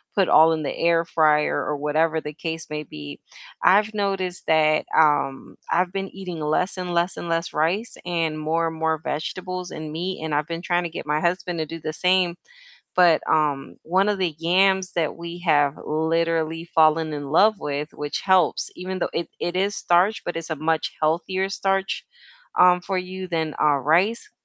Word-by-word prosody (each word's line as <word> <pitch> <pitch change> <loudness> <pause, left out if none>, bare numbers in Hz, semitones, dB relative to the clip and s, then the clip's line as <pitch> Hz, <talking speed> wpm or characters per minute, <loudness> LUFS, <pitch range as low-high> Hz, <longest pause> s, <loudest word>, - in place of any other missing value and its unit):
put 195 -3 +2
all 160 +1 +7
in 155 -1 -1
the - - -3
air 170 0 +2
fryer 150 -2 +2
or 150 -1 -2
whatever 155 +2 +1
the 150 -1 -7
case 160 +1 -5
may 150 0 -3
be. 75 - -9 0.4
I've 210 +3 +4
noticed 195 -3 -2
that, 155 -1 +3
um, 145 -3 +2
I've 180 +2 +1
been 195 0 -3
eating 180 -4 -7
less 155 +6 0
and 180 -1 -4
less 170 +2 +1
and 170 - -6
less 165 +1 -1
rice 180 +10 0
and 165 -3 -1
more 165 +2 0
and 160 - -5
more 160 0 0
vegetables 180 +4 -4
and 155 -1 -7
meat, 175 +1 -4
and 155 -2 -3
I've 150 +2 0
been 170 +1 -5
trying 175 -1 +1
to - - -3
get 160 - -7
my 150 +1 0
husband 175 -1 -1
to 155 - -2
do 165 +1 -7
the 155 0 -5
same, 180 0 +2 0.6
but, 175 -3 +5
um, 150 -3 0
one 190 +5 +2
of 205 -2 0
the 175 -5 -1
yams 190 +2 +2
that 165 -3 0
we 170 +1 -7
have 145 -2 +3
literally 165 +1 0
fallen 160 -1 +3
in 145 -2 -5
love 210 +6 +4
with 145 +1 -4
which 145 0 -4
helps 190 -4 +2
even 185 +1 -5
though - - -1
it 170 - -3
it 175 - -2
is 200 +2 +1
starch, 180 +5 +2
but 175 - -4
it's 165 0 -5
a 160 - -1
much 160 +1 -1
healthier 180 +5 0
starch, 195 0 -1 0.5
um, 180 0 +6
for 185 +1 -2
you 185 +1 -6
than, 160 -3 -2
uh, 150 -2 +4
rice, 185 - +1
165 Hz, 190 wpm, -23 LUFS, 155-185 Hz, 0.6 s, all